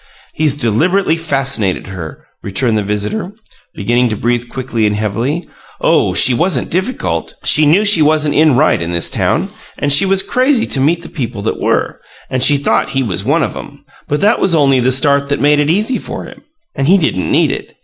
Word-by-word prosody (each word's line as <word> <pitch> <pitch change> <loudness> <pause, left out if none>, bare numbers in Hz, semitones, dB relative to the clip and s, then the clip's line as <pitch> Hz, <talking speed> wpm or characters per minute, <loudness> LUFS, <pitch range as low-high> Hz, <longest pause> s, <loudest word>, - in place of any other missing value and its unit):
"He's 150 -2 0
deliberately 160 - +1
fascinated 135 - -1
her," 90 -5 -9 0.2
returned 110 +4 -1
the 105 - +1
visitor, 105 - -3 0.4
beginning 120 +4 0
to 110 - -3
breathe 120 +1 -2
quickly 120 -4 -2
and 105 - -1
heavily. 115 - -3 0.3
"Oh, - - +1
she 130 - +5
wasn't 160 -1 -1
difficult! 190 +9 -3
She 155 -1 +4
knew 185 +8 +3
she 205 -6 +4
wasn't 150 -1 +2
in 155 -2 +3
right 150 - +2
in 85 +1 -4
this 85 -1 0
town, - - -1 0.3
and 145 -1 0
she 145 +7 +5
was 195 0 +3
crazy 255 -1 +1
to 135 - 0
meet 165 +5 +1
the - - -8
people 120 -8 -5
that 110 - -3
were, - - -1 0.3
and 130 -1 -1
she 145 - +4
thought 140 - 0
he 135 0 -1
was 95 -5 -3
one 145 +7 +1
of - - -4
'em. 145 0 -11 0.2
But 145 - -2
that 210 +3 +2
was 175 - +2
only 135 -4 +3
the 125 +1 +1
start 140 +2 +2
that 140 - -1
made 145 0 +3
it 145 0 +1
easy 215 +9 0
for - - -7
him - - -13 0.3
and 135 - -2
he 190 +4 +5
didn't 155 - -1
need - - +2
it. - - -7
140 Hz, 205 wpm, -14 LUFS, 120-165 Hz, 0.4 s, she